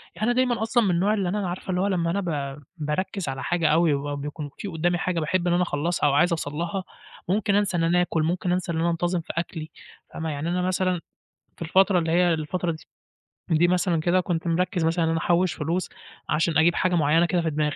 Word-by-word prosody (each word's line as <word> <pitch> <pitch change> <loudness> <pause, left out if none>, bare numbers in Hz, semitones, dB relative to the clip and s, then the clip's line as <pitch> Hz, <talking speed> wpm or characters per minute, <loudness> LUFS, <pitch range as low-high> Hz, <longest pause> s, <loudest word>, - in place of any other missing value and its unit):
يعني 215 - -2
أنا 245 - +3
دايمًا 250 -2 +1
أصلًا 235 +1 +2
من 200 - +1
النوع 185 +5 +2
اللي 195 -4 0
أنا 195 -1 -1
عارفة 180 +2 -7
اللي 180 0 0
هو 200 - +1
لمّا 170 -4 0
أنا 200 +3 0
ب 145 -5 -3 0.2
باركّز 160 +3 -2
على 135 0 -4
حاجة 175 -2 +1
أوي 160 0 +4
وبيبقى 145 +1 -3
بيكون 150 +1 -6
في - - -6
قدَّامي 175 0 0
حاجة 175 -1 -1
باحب 175 +3 0
إن 175 - +3
أنا 180 +1 +3
أخلّصها 170 -1 0
أو 140 - +2
عايز 175 +5 +3
أوصل 160 -3 -3
لها، 170 +5 -3 0.5
ممكن 200 +1 +1
أنسى 200 -3 +1
إن 165 - +1
أنا 175 +2 +3
آكُل، 165 -3 0
ممكن 175 +2 -1
أنسى 180 -1 -1
إن 160 - -2
أنا 170 +1 +2
انتظم 175 +1 0
في - - -7
أكْلي، 160 -2 -4 0.4
فاهمة، 160 0 -4
يعني 150 +2 -3
أنا 180 +1 0
مثلًا 185 -1 0 0.6
في - - -9
الفترة 190 +3 +3
اللي 165 -1 -1
هي 175 -1 +4
الفترة 170 +3 -2
د - - -6 0.7
دي 165 +2 +4
مثلًا 180 -1 +1
كده 175 +3 +2
كنت 175 -2 -2
مركّز 175 0 0
مثلًا 165 +1 +1
أنا 165 0 +1
أحوّش 175 +2 +2
فلوس 170 +4 -2 0.4
عشان 160 +1 +1
أجيب 170 +2 +4
حاجة 185 -1 +1
معيّنة 160 +1 +3
كده 175 0 +1
في 165 - 0
دماغي، 150 -1 -1
175 Hz, 235 wpm, -25 LUFS, 160-185 Hz, 0.7 s, أوي